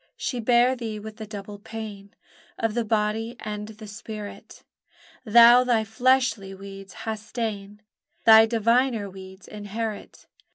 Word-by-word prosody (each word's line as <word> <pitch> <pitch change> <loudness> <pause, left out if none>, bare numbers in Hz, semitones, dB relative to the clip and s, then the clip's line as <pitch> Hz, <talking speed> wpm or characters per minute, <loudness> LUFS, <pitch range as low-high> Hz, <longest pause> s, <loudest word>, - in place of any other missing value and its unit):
She 250 - -3
bare 240 +2 +3
thee 225 -3 -5
with 215 +1 -10
a 215 - -6
double 205 -1 -8
pain, 210 -2 -9 0.4
Of 225 -1 -1
the 235 +1 0
body 220 +2 -1
and 210 -1 -5
the 215 0 -11
spirit; 210 0 -9 0.6
Thou 235 +2 +8
thy 240 -3 +2
fleshly 220 -3 +1
weeds 195 0 -11
hast 220 0 -6
ta'en, 210 -3 -4 0.4
Thy 225 0 +8
diviner 230 0 +1
weeds 190 0 -12
inherit! 210 +1 -6
220 Hz, 130 wpm, -25 LUFS, 205-230 Hz, 0.6 s, Thou